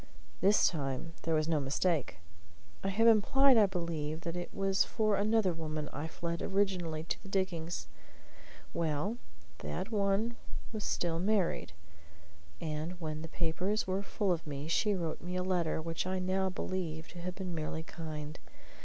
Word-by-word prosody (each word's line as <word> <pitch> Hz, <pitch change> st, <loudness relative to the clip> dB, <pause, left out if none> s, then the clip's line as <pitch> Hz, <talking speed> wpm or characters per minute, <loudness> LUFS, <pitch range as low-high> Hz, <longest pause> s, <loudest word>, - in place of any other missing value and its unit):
This 200 Hz, +4 st, +6 dB
time 145 Hz, 0 st, -2 dB
there 165 Hz, -1 st, +1 dB
was 155 Hz, 0 st, +2 dB
no 160 Hz, -2 st, +3 dB
mistake. 145 Hz, -, +1 dB, 0.7 s
I 195 Hz, -, +1 dB
have 220 Hz, +4 st, +3 dB
implied, 255 Hz, +5 st, +6 dB
I 215 Hz, -3 st, +7 dB
believe, 165 Hz, -4 st, -2 dB
that 170 Hz, 0 st, -3 dB
it 175 Hz, 0 st, -4 dB
was 195 Hz, 0 st, +2 dB
for 215 Hz, -2 st, +1 dB
another 210 Hz, -2 st, +3 dB
woman 155 Hz, -2 st, -3 dB
I 145 Hz, +3 st, -3 dB
fled 170 Hz, +1 st, -3 dB
originally 185 Hz, -5 st, 0 dB
to 165 Hz, -, -3 dB
the 195 Hz, -, -11 dB
diggings. 175 Hz, -4 st, -1 dB, 0.9 s
Well, 165 Hz, +7 st, 0 dB, 0.4 s
that 75 Hz, -, -4 dB
one 210 Hz, +3 st, +1 dB, 0.4 s
was 215 Hz, -2 st, -3 dB
still 170 Hz, -2 st, 0 dB
unmarried, 185 Hz, -, +1 dB, 0.9 s
and 160 Hz, +3 st, -3 dB
when 155 Hz, -2 st, -3 dB
the 165 Hz, -, -5 dB
papers 185 Hz, +6 st, 0 dB
were 190 Hz, +1 st, 0 dB
full 200 Hz, -1 st, 0 dB
of 165 Hz, -2 st, -1 dB
me 145 Hz, +1 st, -4 dB
she 205 Hz, +5 st, +3 dB
wrote 165 Hz, -4 st, -2 dB
me 180 Hz, +1 st, -4 dB
a 180 Hz, -, 0 dB
letter 180 Hz, -4 st, +1 dB
which 165 Hz, +2 st, -2 dB
I 185 Hz, 0 st, 0 dB
now 190 Hz, +1 st, +1 dB
believe 175 Hz, -4 st, -3 dB
to 175 Hz, -, -9 dB
have 180 Hz, +1 st, -4 dB
been 185 Hz, -2 st, -4 dB
merely 160 Hz, 0 st, -3 dB
kind. 155 Hz, -2 st, -6 dB
175 Hz, 160 wpm, -33 LUFS, 160-195 Hz, 0.9 s, I